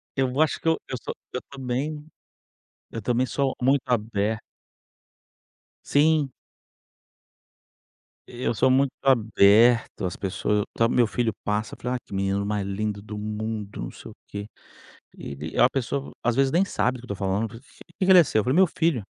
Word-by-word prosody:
Eu 135 Hz, +1 st, 0 dB
acho 155 Hz, -, +2 dB
que -, -, -4 dB
eu 160 Hz, -, +4 dB
eu 130 Hz, -, -4 dB
sou -, -, -6 dB, 0.2 s
eu 125 Hz, -, -3 dB
também, 140 Hz, +3 st, -4 dB, 0.9 s
eu 115 Hz, -, -5 dB
também 120 Hz, +3 st, +1 dB
sou 135 Hz, 0 st, -1 dB
muito 135 Hz, +1 st, +4 dB
aberto. 110 Hz, -3 st, 0 dB, 1.4 s
Sim. 150 Hz, -2 st, +3 dB, 2.0 s
Eu 120 Hz, -1 st, -2 dB
sou 130 Hz, -, +3 dB
muito 135 Hz, +1 st, +3 dB
aberto, 115 Hz, -3 st, +4 dB
as 90 Hz, -, -3 dB
pessoa, 105 Hz, +2 st, -1 dB
ta 115 Hz, -, +3 dB
meu 120 Hz, 0 st, +3 dB
filho 115 Hz, 0 st, -1 dB
passa, 105 Hz, +1 st, -2 dB
fala: 125 Hz, +1 st, -3 dB
"ah 125 Hz, -, -3 dB
que -, -, -14 dB
menino 100 Hz, +1 st, 0 dB
mais 105 Hz, -1 st, -1 dB
lindo 100 Hz, +1 st, -3 dB
do 105 Hz, 0 st, -8 dB
mundo, 105 Hz, -, -4 dB
não -, -, -5 dB
sei -, -, -11 dB
o -, -, -16 dB
quê," 100 Hz, 0 st, -6 dB, 0.7 s
ele 70 Hz, +3 st, -6 dB
a 125 Hz, -, +7 dB
pessoa 135 Hz, +1 st, -3 dB
às 120 Hz, -1 st, +1 dB
vezes 135 Hz, 0 st, +3 dB
nem 180 Hz, +4 st, +4 dB
sabe 130 Hz, -9 st, -1 dB
do 125 Hz, -, -12 dB
que -, -, -2 dB
eu -, -, -3 dB
estou 100 Hz, 0 st, -3 dB
falando, 100 Hz, +4 st, 0 dB
que 170 Hz, +6 st, -7 dB
que -, -, +3 dB
ele 180 Hz, -2 st, +9 dB
seu? 110 Hz, -, +1 dB
Eu -, -, -3 dB
falei 130 Hz, +3 st, +1 dB
meu 190 Hz, +2 st, +6 dB
filho. 160 Hz, -9 st, 0 dB
120 Hz, 175 wpm, -25 LUFS, 105-135 Hz, 2.0 s, ele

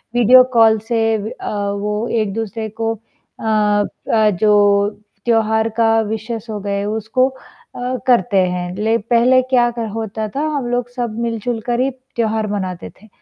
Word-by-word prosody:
Video 245 Hz, +2 st, +7 dB
call 225 Hz, -2 st, +5 dB
से 235 Hz, -1 st, 0 dB, 0.2 s
व 210 Hz, +1 st, -5 dB
अ, 205 Hz, -1 st, -2 dB
वो 210 Hz, +2 st, -2 dB
एक-दूसरे 220 Hz, +1 st, -3 dB
को 225 Hz, 0 st, 0 dB
अ 225 Hz, +1 st, -20 dB
अ, 210 Hz, 0 st, +1 dB
जो 205 Hz, +1 st, +3 dB, 0.4 s
त्योहार 220 Hz, -1 st, +2 dB
का 225 Hz, -1 st, +3 dB, 0.2 s
विशेज़ 220 Hz, +1 st, -4 dB
हो 210 Hz, -, -4 dB
गए, 200 Hz, 0 st, -2 dB
उसको 220 Hz, +4 st, 0 dB
अ, 260 Hz, -, -7 dB
करते 240 Hz, -4 st, +3 dB
हैं। 180 Hz, 0 st, -4 dB
ले 220 Hz, +3 st, +1 dB
पहले 240 Hz, +3 st, +3 dB
क्या 240 Hz, -2 st, +4 dB
क 230 Hz, -, -2 dB
होता 220 Hz, -1 st, -3 dB
था, 285 Hz, -, -1 dB
हम 270 Hz, -4 st, -2 dB
लोग 245 Hz, 0 st, -1 dB
सब 240 Hz, -3 st, -4 dB
मिल 230 Hz, -1 st, -1 dB
जुलकर 240 Hz, 0 st, -2 dB
ही 260 Hz, +2 st, +2 dB, 0.3 s
त्योहार 220 Hz, -2 st, 0 dB
मनाते 185 Hz, -4 st, -4 dB
थे, 220 Hz, -, -17 dB
220 Hz, 160 wpm, -18 LUFS, 210-240 Hz, 0.4 s, Video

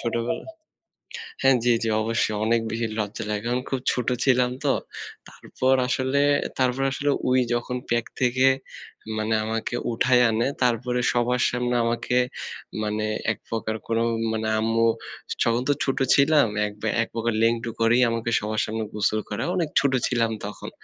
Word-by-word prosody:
ছোটবেলায় 120 Hz, -, -3 dB, 0.9 s
হ্যাঁ, 135 Hz, -1 st, +5 dB
জি, 120 Hz, -1 st, +4 dB
জি 115 Hz, -, 0 dB
অবশ্যই 110 Hz, -1 st, 0 dB
অনেক 115 Hz, 0 st, +2 dB
বেশি 115 Hz, 0 st, -1 dB
লজ্জা 105 Hz, +1 st, -3 dB
লাগে। 105 Hz, +1 st, -2 dB
কারণ 125 Hz, +1 st, 0 dB
খুব 135 Hz, -, -1 dB
ছোট 125 Hz, -2 st, -2 dB, 0.2 s
ছিলাম 125 Hz, -2 st, +3 dB
তো। -, -, +4 dB, 0.6 s
তারপর 130 Hz, +1 st, -1 dB
আসলে, 130 Hz, +2 st, +1 dB, 0.4 s
তারপর 130 Hz, +1 st, +1 dB
আসলে 145 Hz, +1 st, -1 dB, 0.2 s
ওই 130 Hz, -, +4 dB
যখন 120 Hz, +1 st, -2 dB
প্যাক 120 Hz, -1 st, +1 dB, 0.2 s
থেকে 130 Hz, +2 st, +3 dB, 0.7 s
মানে 110 Hz, +1 st, 0 dB
আমাকে 110 Hz, +2 st, -2 dB, 0.2 s
উঠায় 125 Hz, +2 st, +3 dB
আনে 115 Hz, +4 st, +1 dB, 0.2 s
তারপরে 125 Hz, +1 st, +1 dB
সবার 120 Hz, +1 st, +1 dB
সামনে 125 Hz, 0 st, -1 dB
আমাকে 120 Hz, +2 st, 0 dB, 0.7 s
মানে 105 Hz, 0 st, -1 dB, 0.3 s
একপ্রকার 110 Hz, -1 st, -4 dB
কোনো 115 Hz, 0 st, +1 dB, 0.3 s
মানে 110 Hz, 0 st, -2 dB
আম্মু 115 Hz, +1 st, +2 dB, 0.4 s
স -, -, +1 dB
তখন 115 Hz, +1 st, +1 dB
তো -, -, +5 dB
ছোট 135 Hz, -, -1 dB, 0.2 s
ছিলাম 140 Hz, -2 st, +4 dB, 0.2 s
এক 105 Hz, -, -5 dB
বা 110 Hz, -, 0 dB
একপ্রকার 115 Hz, 0 st, -2 dB
লেংটু 115 Hz, 0 st, +1 dB
করেই 120 Hz, +2 st, +4 dB
আমাকে 115 Hz, 0 st, -2 dB
সবার 110 Hz, +1 st, -1 dB
সামনে 110 Hz, 0 st, -3 dB
গোসল 105 Hz, +1 st, +1 dB
করা। 105 Hz, +2 st, -3 dB
অনেক 165 Hz, -4 st, 0 dB
ছোট 140 Hz, -2 st, +1 dB
ছিলাম 115 Hz, -2 st, +1 dB
তখন। 105 Hz, -, -7 dB
120 Hz, 155 wpm, -24 LUFS, 110-125 Hz, 0.9 s, হ্যাঁ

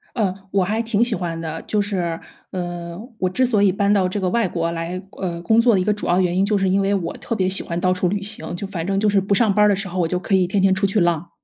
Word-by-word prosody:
呃， 200 Hz, -6 st, 0 dB, 0.2 s
我 195 Hz, -1 st, +2 dB
还 215 Hz, +4 st, -1 dB
挺 230 Hz, 0 st, +1 dB
喜 240 Hz, -2 st, -1 dB
欢 170 Hz, -4 st, -3 dB
的。 160 Hz, 0 st, -5 dB
就 210 Hz, -, -1 dB
是， 180 Hz, -5 st, -2 dB, 0.3 s
嗯， 175 Hz, -1 st, -5 dB, 0.2 s
我 185 Hz, -, +1 dB
之 255 Hz, +7 st, +1 dB
所 220 Hz, -5 st, +2 dB
以 200 Hz, -, +5 dB
搬 200 Hz, +2 st, +1 dB
到 190 Hz, -3 st, +3 dB
这 200 Hz, +3 st, -3 dB
个 185 Hz, -, 0 dB
外 235 Hz, -4 st, +1 dB
国 170 Hz, -1 st, -2 dB
来， 170 Hz, +2 st, -4 dB, 0.2 s
呃， 175 Hz, -3 st, -3 dB
工 220 Hz, +6 st, +4 dB
作 235 Hz, -1 st, +4 dB
的 190 Hz, -, +3 dB
一 -, -, 0 dB
个 210 Hz, -, +2 dB
主 210 Hz, -, -3 dB
要 175 Hz, +2 st, +3 dB
原 180 Hz, -1 st, +1 dB
因 190 Hz, -, +3 dB
就 210 Hz, +1 st, +1 dB
是 195 Hz, -1 st, +1 dB
因 195 Hz, +2 st, +2 dB
为 195 Hz, +1 st, +1 dB
我 175 Hz, -4 st, -2 dB
特 -, -, -3 dB
别 185 Hz, -4 st, 0 dB
喜 190 Hz, -, +2 dB
欢 170 Hz, -1 st, -4 dB
到 185 Hz, 0 st, +2 dB
处 180 Hz, 0 st, 0 dB
旅 200 Hz, +2 st, -2 dB
行， 200 Hz, -6 st, -4 dB
就 200 Hz, -, -5 dB
反 175 Hz, -4 st, -5 dB
正 195 Hz, 0 st, 0 dB
就 210 Hz, +1 st, +2 dB
是 200 Hz, -1 st, +3 dB
不 200 Hz, +1 st, 0 dB
上 215 Hz, -2 st, +3 dB
班 210 Hz, +1 st, +4 dB
儿 -, -, +5 dB
的 200 Hz, -, +3 dB
时 195 Hz, +1 st, -4 dB
候， 185 Hz, +1 st, -5 dB
我 165 Hz, -, +1 dB
就 180 Hz, +1 st, 0 dB
可 195 Hz, +1 st, -2 dB
以 185 Hz, -1 st, +4 dB
天 190 Hz, +2 st, 0 dB
天 190 Hz, -1 st, +4 dB
出 200 Hz, +1 st, +1 dB
去 200 Hz, +2 st, +1 dB
浪。 170 Hz, -1 st, +1 dB
190 Hz, 340 characters per minute, -21 LUFS, 175-205 Hz, 0.3 s, 以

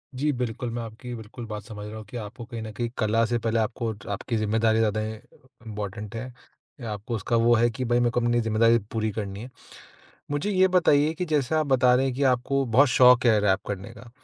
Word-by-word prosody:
जी 150 Hz, +3 st, 0 dB
बिल्कुल, 120 Hz, -1 st, -3 dB
मैं 120 Hz, 0 st, -4 dB
आपकी 115 Hz, +2 st, -9 dB
ये 120 Hz, -, -4 dB
बिल्कुल 115 Hz, +2 st, -9 dB
बात 105 Hz, -2 st, -6 dB
समझ 105 Hz, -2 st, -9 dB
रहा 110 Hz, -, -8 dB
हूँ 110 Hz, -, -9 dB
कि 115 Hz, +4 st, -8 dB
आपको 115 Hz, +2 st, -8 dB
कहीं 115 Hz, -2 st, -7 dB
न 110 Hz, -1 st, -6 dB
कहीं 120 Hz, +1 st, -3 dB
कला 110 Hz, +1 st, +2 dB
से 120 Hz, +1 st, 0 dB
पहले 115 Hz, 0 st, 0 dB
आपको 110 Hz, 0 st, -2 dB
ज 100 Hz, -, -15 dB
आपकी 100 Hz, +4 st, -3 dB
ज़िम्मेदारी 110 Hz, +1 st, +1 dB
ज़्यादा 110 Hz, -1 st, +1 dB
इ 110 Hz, 0 st, -5 dB, 0.5 s
इम्पोर्टेंट 105 Hz, +1 st, -6 dB
है। 125 Hz, +3 st, -6 dB, 0.6 s
आपको 105 Hz, +3 st, -4 dB
उसका 110 Hz, +3 st, -1 dB
वो 115 Hz, +1 st, +4 dB
है 120 Hz, +1 st, +3 dB
कि 125 Hz, +3 st, -4 dB
भई 120 Hz, 0 st, +2 dB
मेरे 120 Hz, -1 st, +2 dB
को 120 Hz, -, +1 dB
अपनी 120 Hz, 0 st, +2 dB
ज़िम्मेदारीयाँ 115 Hz, +1 st, +3 dB
पूरी 110 Hz, -2 st, -1 dB
करनी 100 Hz, -1 st, -5 dB
है। 125 Hz, -, -8 dB, 0.8 s
मुझे 145 Hz, +8 st, -1 dB
ये 190 Hz, -1 st, +4 dB
बताइए 155 Hz, -4 st, +3 dB
कि 180 Hz, -, -3 dB
जैसे 150 Hz, -3 st, 0 dB
आप 155 Hz, -1 st, +1 dB
बता 130 Hz, -2 st, +4 dB
रहे 135 Hz, +2 st, +2 dB
हैं 130 Hz, -, -2 dB
कि 140 Hz, -, -3 dB
आपको 135 Hz, +1 st, +2 dB
बहुत 130 Hz, +4 st, +4 dB
शौक 125 Hz, +1 st, +6 dB
है 110 Hz, -2 st, +5 dB
रैप 95 Hz, -1 st, +2 dB
करने 100 Hz, -1 st, -5 dB
का। 115 Hz, +2 st, -13 dB
115 Hz, 235 wpm, -25 LUFS, 110-125 Hz, 0.8 s, शौक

